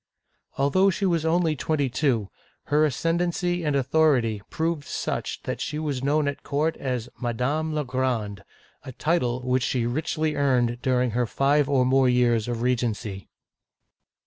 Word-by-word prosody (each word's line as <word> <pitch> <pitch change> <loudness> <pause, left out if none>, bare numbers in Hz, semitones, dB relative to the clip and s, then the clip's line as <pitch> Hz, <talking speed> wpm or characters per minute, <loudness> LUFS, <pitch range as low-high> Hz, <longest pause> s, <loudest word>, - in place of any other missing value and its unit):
" - - -36
Although 185 +8 +3
she 195 +2 -1
was 170 -4 +1
only 165 -1 +2
twenty 145 0 0
two, 120 -5 0 0.4
her 150 +1 +5
ascendency 175 +4 0
and 150 -2 0
authority 130 -6 +2
proved 160 -2 -2
such - - -3
that - - -4
she 150 - -3
was 145 -4 -2
known 145 +1 +2
at 140 - -3
court 155 +3 -1
as 125 -3 -3
" - - -27
Madame 130 +7 -1
la 150 -1 -1
Grande," 120 -6 -2 0.4
a 130 - -9
title 125 -5 0
which 125 0 +1
she 120 -1 0
richly 155 +4 -1
earned 125 -4 +1
dur 125 -1 +2
ing 125 - -1
her 120 +1 0
five 140 +4 +2
or 130 -3 +3
more 130 0 +4
years 120 -3 +2
of 120 -1 -3
regency. 115 -5 -2
135 Hz, 165 wpm, -25 LUFS, 125-155 Hz, 0.4 s, her